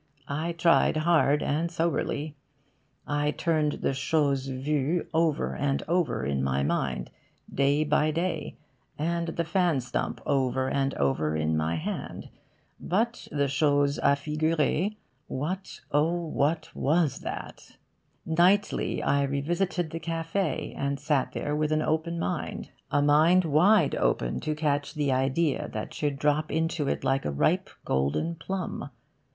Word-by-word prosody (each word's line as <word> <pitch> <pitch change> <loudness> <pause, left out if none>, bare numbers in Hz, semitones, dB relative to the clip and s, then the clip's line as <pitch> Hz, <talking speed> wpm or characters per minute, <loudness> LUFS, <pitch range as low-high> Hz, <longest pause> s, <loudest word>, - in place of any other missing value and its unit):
I 155 +4 -2
tried 165 -1 +3
hard 155 -3 +3
and 160 +4 0
soberly. 160 -3 -1 0.7
I 145 0 0
turned 155 -1 +1
the - - +1
'chose 135 0 +1
vue' 145 +5 -1
over 160 -2 +1
and 140 -1 0
over 175 0 0
in 70 -1 0
my 70 0 0
mind, 70 - -1 0.4
day 140 +2 +2
by 150 0 +2
day, 160 -5 -2 0.4
and 170 +2 -1
the 165 +1 -1
fan 170 -3 +1
stump 125 0 -3
over 130 -1 +1
and 135 0 0
over 75 +3 0
in 80 0 0
my 80 +1 0
hand. 80 - -5 0.5
But 225 +6 -1
the 145 -1 +1
'chose 145 0 +2
a' 140 - +4
figurer' 155 +4 0 0.4
what, 180 +8 -4
oh 155 +4 +2
what, 155 +1 0
was 155 0 +1
that? - - -8 0.5
Nightly 175 +5 +2
I 140 - +2
revisited 160 +5 -1
the 165 - -4
cafe', 165 0 -2
and 140 0 -2
sat 145 -2 0
there 145 0 -2
with 155 0 0
an 155 0 +2
open 160 +2 -1
mind 90 - -3 0.2
a 145 - +2
mind 160 +5 +5
wide 165 +2 +4
open - - 0
to 155 -1 -2
catch 145 0 -1
the 145 -2 +1
idea 135 +4 +1
that 110 - -5
should 145 -2 -2
drop 150 +2 +1
into 160 -2 0
it - - -1
like 135 0 +1
a - - -1
ripe 70 - +1 0.2
golden 70 - 0
plum. 185 +3 -4
150 Hz, 140 wpm, -27 LUFS, 140-165 Hz, 0.7 s, mind